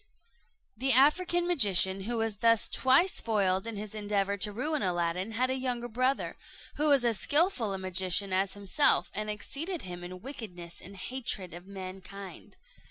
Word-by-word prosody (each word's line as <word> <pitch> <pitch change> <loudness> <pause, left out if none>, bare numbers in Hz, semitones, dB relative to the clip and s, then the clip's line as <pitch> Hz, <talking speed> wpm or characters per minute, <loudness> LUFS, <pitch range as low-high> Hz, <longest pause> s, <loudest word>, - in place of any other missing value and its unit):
The 265 0 +1
African 345 +7 +3
magician, 195 - +5
who 235 +1 -2
was 225 -2 -1
thus 230 0 +3
twice 270 +9 +3
foiled 195 -3 0
in 225 -2 -5
his 210 0 -7
endeavour 205 -2 -1
to 210 +1 +2
ruin 295 +8 -1
Aladdin, 180 +2 -2
had 255 +3 0
a - - 0
younger 250 -2 -3
brother, 255 +4 -1 0.4
who 300 +1 +2
was 275 -4 +4
as 230 -4 +1
skilful 290 - +2
a 195 - -3
magician 185 +1 +2
as 190 +1 0
himself, 205 +9 +2
and 215 0 -3
exceeded 300 - -4
him 175 -1 -8
in 180 +2 -9
wickedness 180 -10 -8
and 195 +3 -12
hatred 215 -4 -4
of 175 +2 -11
mankind. 190 0 -10
210 Hz, 165 wpm, -29 LUFS, 190-255 Hz, 0.4 s, magician